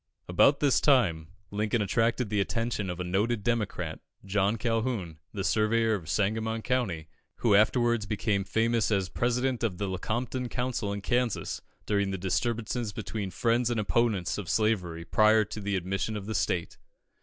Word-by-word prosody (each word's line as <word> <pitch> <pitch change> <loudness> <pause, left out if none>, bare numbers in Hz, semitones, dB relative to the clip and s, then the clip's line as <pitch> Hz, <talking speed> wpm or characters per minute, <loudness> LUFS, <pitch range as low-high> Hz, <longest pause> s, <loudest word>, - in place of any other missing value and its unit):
About 135 +11 +4
this 140 -3 +3
time, 95 - +3 0.2
Lincoln 105 +3 0
attracted 115 +2 +1
the 105 - +1
attention 115 -1 -2
of 90 0 -4
a - - -1
noted 100 +5 0
Democrat, 100 -8 -1 0.3
John 100 +2 +1
Calhoun, 115 -7 -2
the 100 - -4
surveyor 110 +2 +2
of 85 -7 -4
Sangamon 110 +5 0
County, 100 -12 -1 0.3
who 115 - +2
afterwards 120 +1 +3
became 100 -1 0
famous 115 +3 +1
as 95 -4 0
President 125 +1 0
of 100 -6 -1
the 100 - -2
Lecompton 120 +6 -2
Council 120 -4 -2
in 100 0 -4
Kansas, 120 +1 -1 0.2
during 100 -2 +1
the 95 - -2
disturbances 115 +4 -1
between 100 -1 -4
the 90 - -14
friends 120 +1 +2
and 120 -2 0
opponents 105 -3 +1
of 95 -5 -6
slavery 90 -6 0
prior 110 +2 +4
to 105 +1 -7
the 100 0 -1
admission 95 +4 -2
of 100 - -6
the 110 - -4
state. 90 -4 -1
110 Hz, 165 wpm, -28 LUFS, 95-115 Hz, 0.3 s, About